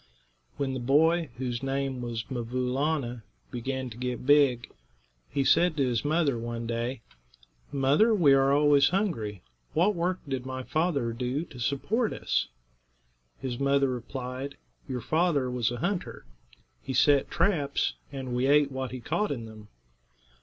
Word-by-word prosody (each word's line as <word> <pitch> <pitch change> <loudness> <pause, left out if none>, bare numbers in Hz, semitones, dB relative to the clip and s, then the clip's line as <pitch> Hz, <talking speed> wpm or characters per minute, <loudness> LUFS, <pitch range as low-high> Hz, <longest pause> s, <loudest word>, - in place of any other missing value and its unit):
When 135 -1 -1
the 130 - -3
boy, 160 +6 +3
whose 125 -2 -3
name 135 -1 -2
was 120 -2 -3
'Mvoo' 125 +1 -2
Laa'na, 135 -4 -1 0.3
began 130 +2 -3
to 110 - -10
get 125 0 -4
big, 140 -4 +4 0.6
he 140 - 0
said 170 +3 +3
to 140 - +3
his 120 -3 0
mother, 150 -5 +1
one 115 0 -4
day: 115 +1 -3 0.7
"Mother, 140 - +3
we 170 -10 +5
are 135 0 +4
always 145 -1 +5
hungry. 115 - -2 0.3
What 180 +7 +4
work 180 +1 -1
did 135 -2 -2
my 130 0 -5
father 145 -7 0
do 125 +5 -2
to 130 -7 -13
support 205 - 0
us?" - - -1 0.9
His 125 -2 -4
mother 140 0 +3
replied: 130 +2 -5 0.3
"Your 125 -2 -3
father 155 -2 +1
was 125 -2 0
a 120 - -4
hunter. 175 - -3 0.6
He 135 - -5
set 140 +1 +4
traps, 150 -8 +1 0.2
and 130 -3 -5
we 125 +2 +1
ate 145 0 +4
what 130 -1 -3
he 130 0 -7
caught 210 - -1
in 120 -5 -4
them." 110 -1 -12
135 Hz, 155 wpm, -28 LUFS, 125-150 Hz, 0.9 s, we